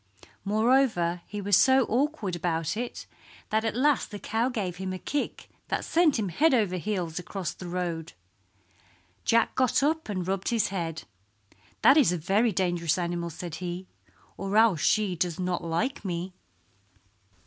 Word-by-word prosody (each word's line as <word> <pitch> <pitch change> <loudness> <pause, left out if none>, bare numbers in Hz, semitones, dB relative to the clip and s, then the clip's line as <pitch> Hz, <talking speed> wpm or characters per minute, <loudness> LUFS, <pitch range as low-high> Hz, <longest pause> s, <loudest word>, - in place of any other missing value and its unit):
Moreover 215 -5 +2
he 205 0 -5
was 200 -1 +3
so 265 +3 +5
awkward 250 - -1
about 165 0 -1
it 240 +2 -5 0.5
that 220 +1 +2
at 225 -1 -1
last 280 +2 +2
the 205 - -6
cow 225 +4 -1
gave 195 -8 -3
him 190 0 -4
a - - -4
kick 290 +9 -3 0.2
that - - -2
sent 325 -4 +3
him 205 -4 -1
head 285 - +3
over 200 -6 +1
heels 180 -3 -3
across 180 -2 -4
the 180 - -9
road. 175 - -3 1.1
Jack 230 0 +3
got 260 +1 +2
up 315 -2 0
and 185 -3 -3
rubbed 190 0 -1
his 230 -3 +1
head. 165 -5 -4 0.8
"That 275 - +7
is 270 - +5
a 180 - 0
very 200 +8 +2
dangerous 175 -4 0
animal," 170 -1 -2
said 170 +1 -7
he, 180 +1 -4 0.5
"or 195 +2 -1
else 220 -8 +5
she 210 -4 +2
does 170 0 -2
not 180 -1 -1
like 190 +12 -2
me." 180 -1 -4
195 Hz, 160 wpm, -27 LUFS, 175-230 Hz, 1.1 s, That